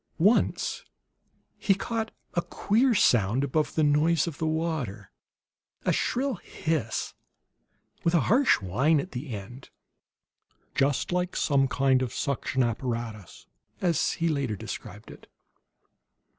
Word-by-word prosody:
Once 205 +8 +2 0.8
he 195 - +3
caught 225 +2 -3 0.2
a 170 - +1
queer 230 +8 +1
sound 120 - +3
above 150 +3 0
the 155 - +2
noise 150 +2 +3
of 165 -5 -6
the 160 - 0
water; 155 - -2 0.7
a - - +3
shrill 260 -2 0
hiss, 155 -9 -3 0.9
with 170 +1 +2
a 165 - +4
harsh 255 +6 +4
whine 135 - +2
at 185 - -5
the 135 +3 -6
end. 115 +5 -8 1.0
"Just 135 +3 +1
like 180 0 -1
some 140 -2 +2
kind 130 -1 +2
of 125 -3 -3
suction 135 -1 0
apparatus," 115 - -4 0.3
as 175 -3 +1
he 170 - -1
later 140 -8 0
described - - -8
it. - - -14
145 Hz, 125 wpm, -27 LUFS, 125-170 Hz, 1.0 s, a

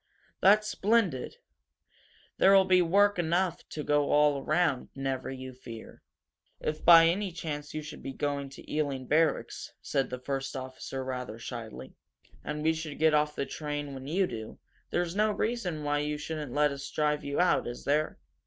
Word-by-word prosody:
That's 210 +2 +5
splendid! 200 - +1 1.0
There'll 195 0 +6
be 185 -1 +5
work 200 +3 +3
enough 175 +1 0
to 150 - -5
go 145 -1 +2
all 145 -2 +3
around, 155 -5 +1
never 135 -1 -3
you 130 -1 -7
fear." 115 -3 -11 0.6
"If, 155 0 -3
by 165 -1 +9
any 190 +3 +1
chance, 150 -3 -5
you 155 - -3
should 150 - -9
be 135 - -5
going 140 0 -2
to 135 - -13
Ealing 140 -4 -1
Barracks," 155 +3 0
said 135 -2 -1
the 125 - -4
first 135 +2 -4
officer, 130 0 -6
rather 125 -4 -5
shyly, 110 - -8 0.5
"and 150 +1 -4
we 160 +1 +3
should 160 -2 -6
get 160 0 +4
off 150 0 +2
the 140 - -1
train 145 -2 -4
when 135 0 -8
you 185 +6 +2
do, 110 -9 -7 0.3
there's 175 0 -1
no 215 +1 +3
reason 200 -8 -2
why 145 0 +1
you 150 0 -2
shouldn't 150 -2 -5
let 150 +2 +3
us 140 0 -6
drive 150 -1 0
you 140 0 -2
out, 180 - +3
is 120 0 -6
there? 150 +2 0
150 Hz, 170 wpm, -29 LUFS, 135-165 Hz, 1.0 s, by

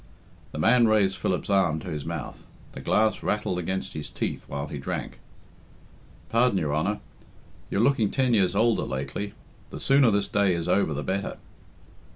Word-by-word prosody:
The - - -7
man 115 +8 +5
raised 105 -3 +3
Philip's 90 - -1
arm 95 -5 +3
to 90 - -7
his 75 -2 -4
mouth; 85 -4 -6 0.2
the - - -9
glass 110 0 +2
rattled 105 -4 -1
against 95 +2 -3
his 75 - -6
teeth - - -4
while 70 0 -4
he 75 -1 -6
drank. 70 - -5 1.1
"Pardon, 115 -2 +3
your 75 -5 -1
honour. 100 +7 -1 0.7
You're 100 - +1
looking 120 -4 +3
ten 130 -3 +1
years 100 -4 +3
older 115 +2 +3
lately. 70 +10 -4 0.3
The - - -7
sooner 135 -2 +4
this 100 -1 +1
day 100 -3 +2
is 85 -1 -3
over 80 -7 +2
the 75 - -3
better." 100 +1 -2
100 Hz, 170 wpm, -26 LUFS, 80-110 Hz, 1.1 s, man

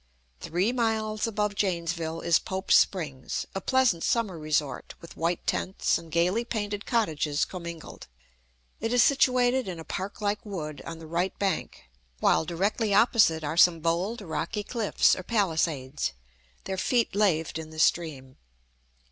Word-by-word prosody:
Three 185 +7 0
miles 220 -3 0
above 210 -2 -1
Janesville 170 -4 -2
is 170 -1 +3
Pope's 190 0 0
Springs, 145 -9 +1
a 195 - -3
pleasant 255 -8 +2
summer 210 -8 0
resort, 150 -3 -2
with 170 - -13
white 170 +1 -1
tents 190 - 0
and 165 -1 -13
gayly 180 +8 +2
painted 205 -3 -4
cottages 160 - +1
commingled. 170 -3 -8 0.7
It 225 +2 -2
is 245 -2 +6
situated 255 -3 +3
in 175 -3 -5
a - - -7
park 190 +4 -5
like 205 0 -1
wood, 155 -9 -6
on 165 - -6
the 160 - -11
right 170 +4 -2
bank, 190 - -2 0.3
while 80 - +3
directly 200 +4 0
opposite 205 -8 +4
are 155 +2 -3
some 175 -1 +6
bold, 175 +8 -1
rocky 195 +4 -3
cliffs, 225 -1 +2
or - - -6
palisades, 160 - -1 0.5
their 190 -1 -4
feet 240 +1 +1
laved 165 -6 +1
in 160 -1 -8
the 155 - -12
stream. 150 -5 0
180 Hz, 150 wpm, -27 LUFS, 160-215 Hz, 0.7 s, is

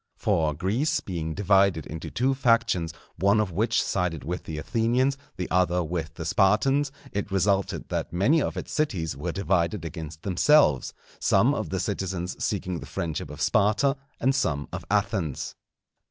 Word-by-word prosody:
For 80 -3 +1
Greece 115 - 0
being 80 -4 -4
divided 95 -4 +3
into 80 +1 -6
two 130 +3 +1
factions, 115 -10 +2 0.3
one 100 +4 +3
of 105 -4 0
which 110 +6 +1
sided 90 -5 -1
with 90 +3 -4
the 80 - -5
Athenians, 120 - +1 0.2
the 90 - -3
other 90 -1 +2
with 80 -1 -4
the 80 - -6
Spartans, 135 - +3 0.2
it 100 0 -3
resulted 100 0 0
that - - -2
many 110 - +3
of - - -2
its - - -5
cities 90 - -1
were 75 +6 -3
divided 95 -1 0
against 80 -1 -7
themselves, 100 - +3 0.2
some - - +3
of - - -3
the - - -2
citizens 90 -1 -3
seeking 90 -4 -2
the - - -9
friendship 80 -4 -4
of 75 0 -8
Sparta 120 +8 +3 0.2
and 130 +3 +2
some 80 - 0
of - - -4
Athens. 80 -8 -1
95 Hz, 160 wpm, -26 LUFS, 80-110 Hz, 0.3 s, divided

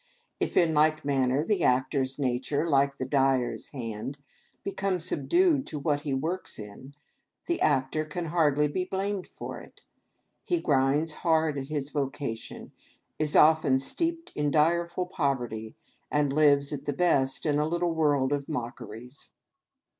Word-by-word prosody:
If, - - -1
in 165 -3 +4
like 155 0 +3
manner, 135 0 +1
the 195 0 0
actor's 130 +1 +1
nature, 135 +3 -1
like 140 -2 +2
the 130 - -3
dyer's 135 -2 +1
hand, 120 0 -6 0.5
become 195 -1 -1
subdued 310 - +2
to 155 - -5
what 145 0 0
he 145 -1 -5
works 160 +8 -3
in, 110 +7 -10 0.5
the 345 - -1
actor 135 +4 +1
can 160 +3 -5
hardly 150 -3 +2
be 180 +5 -2
blamed 195 +1 -3
for - - -8
it. - - -16 0.6
He 350 -2 0
grinds 145 - +1
hard 160 -2 +1
at 135 - -6
his 145 -1 -3
vocation, 135 -5 -4 0.5
is 155 -1 -1
often 155 -3 +5
steeped 330 - -3
in 150 0 0
direful 170 +4 +1
poverty, 125 -10 -2 0.4
and 145 -2 +1
lives, 140 -1 +3
at 145 0 -6
the 145 - -1
best, 135 -5 +1
in 150 -1 +2
a 150 - +1
little 170 +1 0
world 145 -4 +2
of 140 0 -3
mockeries! 120 -2 -7
145 Hz, 145 wpm, -28 LUFS, 135-165 Hz, 0.6 s, often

